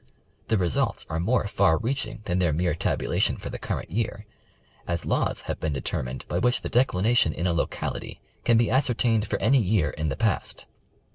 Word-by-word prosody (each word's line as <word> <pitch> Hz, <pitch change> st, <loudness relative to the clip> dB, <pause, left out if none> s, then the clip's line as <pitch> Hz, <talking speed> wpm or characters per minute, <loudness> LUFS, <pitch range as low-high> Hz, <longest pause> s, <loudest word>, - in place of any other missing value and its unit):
The 110 Hz, -, +2 dB
results 90 Hz, -4 st, 0 dB
are 80 Hz, -, -1 dB
more 110 Hz, +7 st, +1 dB
far 80 Hz, -5 st, +3 dB
reach 125 Hz, +1 st, -1 dB
ing 110 Hz, 0 st, -9 dB
than 90 Hz, -1 st, 0 dB
their 85 Hz, -3 st, +2 dB
mere 85 Hz, +2 st, +1 dB
tabulation 80 Hz, -, 0 dB
for -, -, -7 dB
the -, -, -6 dB
current -, -, -4 dB
year, 105 Hz, +1 st, -2 dB, 0.6 s
as 85 Hz, -1 st, -2 dB
laws -, -, 0 dB
have -, -, -4 dB
been 80 Hz, -2 st, -1 dB
determined 65 Hz, -2 st, -3 dB
by -, -, -1 dB
which 125 Hz, +1 st, +2 dB
the -, -, -3 dB
declination 115 Hz, -6 st, +3 dB
in 85 Hz, -, -3 dB
a 90 Hz, -, +2 dB
locality 85 Hz, -, -3 dB, 0.2 s
can 115 Hz, -, +4 dB
be 115 Hz, -, +2 dB
ascertained 120 Hz, -4 st, +2 dB
for -, -, -1 dB
any 130 Hz, +6 st, +3 dB
year 95 Hz, -6 st, +1 dB
in 75 Hz, 0 st, -2 dB
the 70 Hz, -, -3 dB
past. -, -, -1 dB
100 Hz, 195 wpm, -26 LUFS, 80-115 Hz, 0.6 s, can